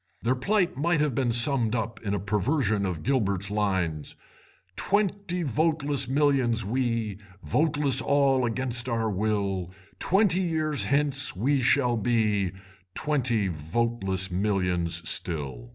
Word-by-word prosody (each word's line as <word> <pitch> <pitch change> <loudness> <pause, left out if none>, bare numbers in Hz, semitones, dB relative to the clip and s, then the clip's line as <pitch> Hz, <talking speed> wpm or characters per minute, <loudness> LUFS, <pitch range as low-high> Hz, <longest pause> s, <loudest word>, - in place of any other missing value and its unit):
Their 120 +3 +2
plight 180 +8 0
might 160 +4 +1
have 150 -3 +1
been 120 0 0
summed 120 -1 +2
up 115 0 -4
in 100 -2 -2
a - - -2
perversion 105 - 0
of 85 -4 -4
Gilbert's 100 -7 0
lines— 95 -8 -1 0.6
"Twenty 200 -3 -1
voteless 145 -1 0
millions 130 -5 +2
we, 115 -3 -1 0.2
Voteless 145 - +1
all 135 -1 +2
against 125 +1 -1
our 115 -2 0
will, 100 -3 -1 0.3
Twenty 190 -1 +2
years 155 -4 0
hence 140 -4 0
we 135 +8 +1
shall 125 -1 +2
be 105 -4 +1 0.4
Twenty 130 -9 0
voteless 95 +3 -2
millions 90 -3 -1
still." 65 -8 -2
120 Hz, 120 wpm, -26 LUFS, 100-140 Hz, 0.6 s, Their